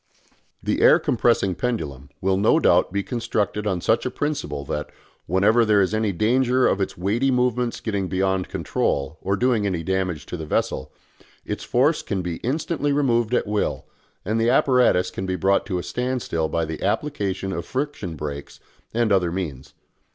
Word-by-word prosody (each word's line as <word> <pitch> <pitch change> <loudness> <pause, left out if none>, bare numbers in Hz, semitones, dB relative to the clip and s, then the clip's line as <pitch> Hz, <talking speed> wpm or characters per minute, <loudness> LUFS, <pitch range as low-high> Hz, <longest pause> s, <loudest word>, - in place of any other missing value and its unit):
The - - 0
air - - +7
compressing 115 -5 +1
pendulum 80 - -3
will 95 0 +2
no 100 +3 +4
doubt - - +3
be 100 +1 -1
constructed 105 -3 -2
on 95 -4 -1
such - - +2
a - - -1
principle 140 - -3
that, 75 +2 -3 0.4
whenever 105 +7 +4
there 105 -2 +4
is 95 +1 +2
any 110 -1 +1
danger 125 +7 +2
of 100 - +2
its 95 - -2
weighty 105 +9 +1
movements 125 -1 +1
getting 100 -4 -2
beyond 95 0 0
control 70 +4 -1
or 100 +1 0
doing 115 -2 +1
any 90 -4 -2
damage 95 -4 -1
to 90 - -6
the 80 - -6
vessel, 65 - -1 0.5
its - - -4
force 145 +6 +2
can 95 -3 -3
be 85 -2 -3
instantly 145 +2 -1
removed 125 -5 +2
at - - +1
will, 105 0 -1 0.4
and 110 +3 0
the 115 - +3
apparatus 125 -8 +3
can 95 - -5
be 95 - -1
brought 95 +3 +1
to 95 - -1
a 90 - -3
standstill 115 -5 -2
by 85 -1 0
the 80 0 -6
application 100 -4 -1
of 85 - -3
friction 130 - -3
brakes 70 -1 -6 0.4
and 115 -2 +2
other 90 -4 +3
means. 80 -8 -5
100 Hz, 175 wpm, -23 LUFS, 90-120 Hz, 0.5 s, air